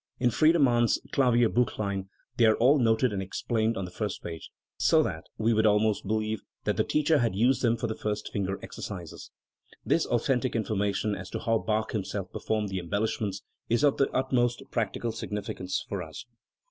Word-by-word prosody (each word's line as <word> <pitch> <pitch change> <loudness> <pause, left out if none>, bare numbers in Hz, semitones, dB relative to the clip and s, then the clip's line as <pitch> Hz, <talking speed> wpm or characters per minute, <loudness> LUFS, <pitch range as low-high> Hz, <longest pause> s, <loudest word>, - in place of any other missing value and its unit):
In 125 -1 +3
Friedemann's 130 -5 +4
Klavierbilchlein 115 -6 +2 0.3
they 115 - +5
are 110 - +5
all 140 +5 +4
noted 115 0 +2
and 95 - -2
explained 110 +4 -1
on 95 - -2
the 90 - -9
first 105 +1 -4
page, 80 -1 -7 0.3
so - - +4
that - - -4
we 115 +1 +2
would 110 0 +3
almost 105 -1 +2
believe 110 0 -1 0.2
that - - 0
the - - +2
teacher 150 0 +2
had 115 -6 0
used 120 +5 +3
them 115 -1 +2
for - - -3
the 110 - -1
first 105 -1 -4
finger 95 -1 -1
exercises. 90 -6 -7 0.6
This - - +2
authen 125 +1 +1
tic 130 - -2
information 105 -1 0
as 95 -1 -6
to - - -4
how 115 -1 +1
Bach 110 0 -1
himself 95 -2 -3
performed 110 -2 -2
the 95 -1 -2
em 85 -1 -9
bellishments 105 - -1 0.3
is 120 +4 +2
of 145 -2 +4
the 135 - +2
utmost 125 -2 0
practical 115 0 -1
significance 100 -4 -4
for 100 -2 -3
us. 80 +6 -8
110 Hz, 185 wpm, -28 LUFS, 100-120 Hz, 0.6 s, they